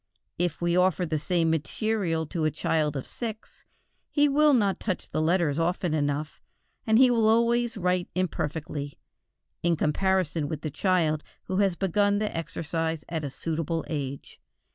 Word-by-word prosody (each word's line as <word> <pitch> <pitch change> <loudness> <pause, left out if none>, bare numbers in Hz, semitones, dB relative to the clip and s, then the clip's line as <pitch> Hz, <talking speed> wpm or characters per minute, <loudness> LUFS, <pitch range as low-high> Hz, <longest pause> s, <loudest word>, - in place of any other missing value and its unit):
If 175 -2 -1
we 175 0 +2
offer 180 0 +3
the 155 -2 -1
same 165 +1 +1
material 165 +1 -1
to 160 +1 -3
a - - +4
child 150 0 0
of 135 - -5
six 225 -2 -7 0.4
he 295 -1 +3
will 300 +2 +4
not 200 -5 +2
touch 185 -4 -3
the - - 0
letters 165 -2 +2
often 175 0 0
enough, 145 0 -2 0.5
and 220 0 +5
he 255 0 +6
will 225 -2 +3
always 235 0 +2
write 180 -1 0
imperfectly, 150 -5 -3 0.6
in 170 -1 +2
comparison 165 0 +1
with 155 -1 -4
the 155 - -3
child 160 -3 +1 0.2
who 185 - -3
has 195 -3 +2
begun 200 +2 +2
the 210 0 -2
exercise 165 -1 -3
at 160 -2 -3
a 145 - -2
suitable 165 +3 -3
age. 140 -3 -5
170 Hz, 160 wpm, -27 LUFS, 155-200 Hz, 0.6 s, he